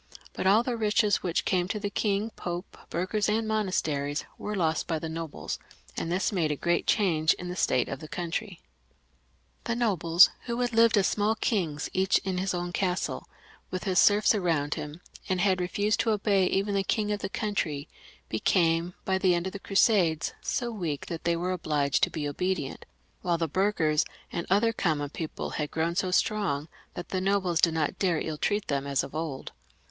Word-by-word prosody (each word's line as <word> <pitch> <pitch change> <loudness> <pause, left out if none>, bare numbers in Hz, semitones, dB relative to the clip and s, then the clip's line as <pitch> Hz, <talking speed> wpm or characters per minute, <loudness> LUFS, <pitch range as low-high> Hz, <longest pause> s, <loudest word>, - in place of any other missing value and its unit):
But - - -1
all 210 +4 +5
the 245 -1 -2
riches 210 -2 +2
which 175 -2 -1
came 180 -2 +1
to 210 +2 -2
the 205 -1 -3
King, 210 +1 0
Pope, 175 -1 -6
burghers, 195 +5 0
and 220 +1 +1
monasteries, 155 -9 -1
were 210 - -4
lost 165 -4 0
by 165 - 0
the 160 - -4
nobles, 160 -1 -5 0.4
and 165 - -3
this 185 +5 +1
made 170 -6 +1
a - - 0
great 170 +4 0
change 165 -7 +3
in 180 - -7
the 180 - -4
state 125 -8 +2
of 135 - -5
the 155 - -9
country. 175 +3 -4 1.0
The 235 - 0
nobles, 185 -7 +5 0.2
who 235 0 -2
had 245 -1 0
lived 230 0 +5
as 195 - +4
small 210 +3 +1
kings, 170 - -1
each 190 +1 +3
in 185 -2 -2
his 190 0 -1
own 175 0 -3
castle 180 -1 -1 0.4
with 185 - -4
his 185 -3 +2
serfs 210 +2 +5
around 165 -8 0
him, 150 +3 -7 0.3
and 185 -1 +1
had 185 -1 +2
refused 205 +4 0
to 230 - +1
obey 200 -3 +2
even 200 +2 0
the 195 -1 +1
king 210 +2 0
of 205 - -1
the - - -4
country, 175 -10 -2 0.4
became 165 - +1
by 190 0 +1
the 185 -2 +3
end 175 +1 -1
of 190 - -4
the 200 - -6
Crusades 190 -6 +2
so 240 -2 -2
weak 170 -10 -3
that 165 -1 -6
they 170 0 +2
were 175 +2 -1
obliged 150 -6 0
to - - +4
be 150 -2 -3
obedient, 180 +6 -3 0.3
while 175 -6 +1
the 165 0 0
burghers 160 -3 +2 0.3
and 170 - -3
other 220 +4 +3
common 150 -8 -1
people 160 -1 -5
had 150 -1 -2
grown 165 +1 -1
so 185 0 0
strong, 180 -7 +1 0.3
that 175 -1 -6
the 185 - -1
nobles 185 -4 +1
did 165 -2 +3
not 155 -2 -1
dare 175 -5 +2
to - - -3
ill 155 -2 -4
treat 205 0 0
them 140 -1 -1
as 140 -2 +1
of - - -8
old. 155 -4 -4
180 Hz, 200 wpm, -28 LUFS, 160-205 Hz, 1.0 s, all